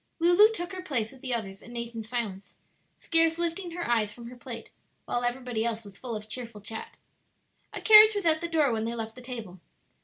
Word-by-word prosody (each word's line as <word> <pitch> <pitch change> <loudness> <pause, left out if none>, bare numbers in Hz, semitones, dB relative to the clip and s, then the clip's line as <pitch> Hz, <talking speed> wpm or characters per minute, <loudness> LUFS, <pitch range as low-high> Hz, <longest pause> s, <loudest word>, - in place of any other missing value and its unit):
Lulu 350 +6 +6
took 350 -3 -4
her 370 - -5
place 250 - -1
with 265 - -16
the 260 - -4
others 195 -4 -6
and 240 0 -10
ate 235 0 -5
in 225 - -5
silence, 215 -4 -5 0.4
scarce 330 0 +2
lifting 345 +2 -2
her 350 0 -4
eyes 225 -3 +1
from 235 +1 -10
her - - -10
plate, 240 -2 -8 0.3
while 240 - -1
everybody 245 -2 -2
else 230 -1 -2
was 200 -1 -12
full 240 +1 -6
of 210 0 -7
cheerful 235 -2 -4
chat. 220 +2 -6 0.8
A - - -6
carriage 430 0 +9
was 405 -3 -2
at 315 -1 +3
the 340 - -3
door 310 -5 +3
when 220 -1 -1
they 230 +1 -3
left 225 -1 -5
the 250 - -12
table. 230 -8 -7
245 Hz, 220 wpm, -28 LUFS, 225-330 Hz, 0.8 s, carriage